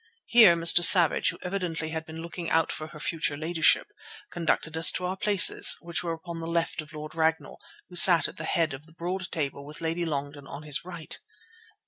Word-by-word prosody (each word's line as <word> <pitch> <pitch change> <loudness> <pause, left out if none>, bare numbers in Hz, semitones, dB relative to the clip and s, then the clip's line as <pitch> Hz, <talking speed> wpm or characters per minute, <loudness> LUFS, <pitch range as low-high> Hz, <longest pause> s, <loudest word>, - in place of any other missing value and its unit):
Here 225 -8 +5
Mr. 170 +1 +4
Savage, 170 -3 +6
who - - -8
evidently 180 -4 -5
had 160 0 -6
been 160 +1 -9
looking 170 0 -7
out 165 0 0
for 155 - -7
her 155 -1 -14
future 150 -2 -4
ladyship, 160 +1 +1 0.5
conducted 165 -1 -3
us 160 0 +6
to 180 - -4
our 185 +1 -4
places, 200 0 +4
which 170 0 -4
were 170 -2 -4
upon 165 +1 -9
the 165 - -7
left 170 -1 -3
of 150 -1 -16
Lord 155 0 -10
Ragnall, 160 0 -2 0.3
who 180 - -15
sat 175 -1 +7
at - - -13
the 160 - -7
head 160 -2 -1
of 140 +4 -11
the 160 - -21
broad 180 +3 -6
table 140 -3 -4
with 150 +1 -11
Lady 165 +1 -3
Longden 145 -2 -6
on 145 - -10
his 150 0 -2
right. 170 -3 -7
165 Hz, 205 wpm, -25 LUFS, 155-175 Hz, 0.5 s, sat